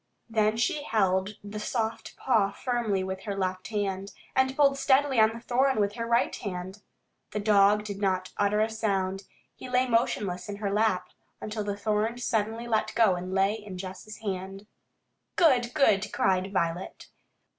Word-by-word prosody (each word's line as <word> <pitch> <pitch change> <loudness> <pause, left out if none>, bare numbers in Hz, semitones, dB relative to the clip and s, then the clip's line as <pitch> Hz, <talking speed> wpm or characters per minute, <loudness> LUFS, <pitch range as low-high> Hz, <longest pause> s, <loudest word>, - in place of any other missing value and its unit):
Then 220 -1 +1
she 240 +6 0
held 195 -5 +1
the 205 +1 -6
soft 225 +1 -3
paw 220 -6 +2
firmly 215 -3 -1
with 190 0 -4
her 200 - -3
left 185 -1 -2
hand, 200 -2 -3 0.2
and 265 0 +2
pulled 275 -1 +3
steadily 270 -1 +3
on 220 0 +6
the 225 +1 -7
thorn 255 +1 +1
with 205 0 +1
her 230 +1 -4
right 235 +1 +2
hand. 190 0 -6 0.5
The 210 - -1
dog 205 0 +4
did 200 -2 -6
not 185 -2 0
utter 205 +1 +2
a 220 - +3
sound. 195 -3 -1 0.3
He 255 - -10
lay 250 +1 +2
motionless 205 -6 0
in 205 - -4
her 200 -1 -3
lap, 210 -4 +1 0.3
until 215 0 -4
the 205 0 -3
thorn 215 +3 0
suddenly 225 -1 -1
let 220 -1 0
go 225 -5 +5
and 180 +1 -5
lay 195 +2 +2
in 210 -4 -8
Jess' 190 +3 -8
hand. 195 0 -5 0.7
"Good, 250 -8 +4
good!" 210 -8 +3
cried 190 +1 +1
Violet. 170 -1 -2
210 Hz, 165 wpm, -28 LUFS, 195-230 Hz, 0.7 s, on